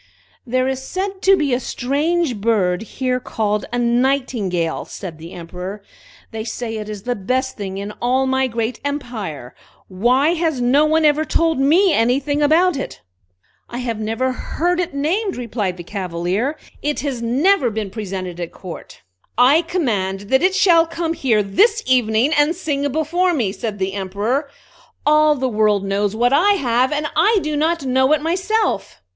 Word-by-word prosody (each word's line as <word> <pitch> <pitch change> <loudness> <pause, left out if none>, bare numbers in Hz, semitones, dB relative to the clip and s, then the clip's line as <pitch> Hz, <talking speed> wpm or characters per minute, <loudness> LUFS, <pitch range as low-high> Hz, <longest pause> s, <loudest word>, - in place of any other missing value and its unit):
"There 255 +2 +1
is 265 0 -2
said 380 +6 -4
to 390 0 +5
be 290 -6 0
a 245 - +1
strange 285 +3 -1
bird 200 -4 +1
here 255 +2 -2
called 210 -3 -2
a 245 - -1
Nightingale!" 235 -8 0
said 170 -5 -8
the 165 +2 -10
Emperor. 180 +4 -7 0.5
"They 220 -1 -4
say 225 -1 -4
it 215 0 -6
is 210 -2 -7
the 245 - -1
best 255 +6 -1
thing 195 -2 -5
in 200 +1 -5
all 255 +2 +2
my 265 0 +1
great 230 0 -3
empire. 225 - -5 0.4
Why 245 +10 +2
has 325 -5 -1
no 260 +5 +3
one 315 0 +2
ever 300 +1 +3
told 325 -1 +1
me 330 +7 +4
anything 275 +5 +1
about 320 +3 +3
it?" 270 - -6 0.7
"I 240 - -6
have 235 -3 -3
never 225 +4 -1
heard 350 +7 -1
it 345 -5 -2
named," 365 +8 -1
replied 215 -6 -3
the 175 - -8
Cavalier. 190 - -2 0.2
"It 295 0 -1
has 275 -5 -3
never 265 +5 +2
been 215 -3 -4
presented 185 -4 -5
at 170 -1 -5
court." 175 - -10 0.3
"I 270 +7 +5
command 220 - -1
that 265 +1 +4
it 375 +1 +2
shall 335 -4 +5
come 330 0 -2
here 230 -9 +1
this 420 - +2
evening, 250 +2 +2
and 295 +3 +3
sing 285 -5 -2
before 340 +5 +1
me," 225 -9 0
said 215 0 -5
the 190 0 -2
Emperor. 205 +9 -2 0.6
"All 305 0 +5
the 265 -1 -1
world 210 -3 +1
knows 200 +1 0
what 245 +3 +2
I 380 +8 +5
have, 255 -7 +1
and 300 0 -1
I 415 +8 +4
do 305 0 -2
not 315 0 0
know 260 +1 +2
it 305 - +1
myself!" 375 - -1
255 Hz, 170 wpm, -19 LUFS, 210-305 Hz, 0.7 s, to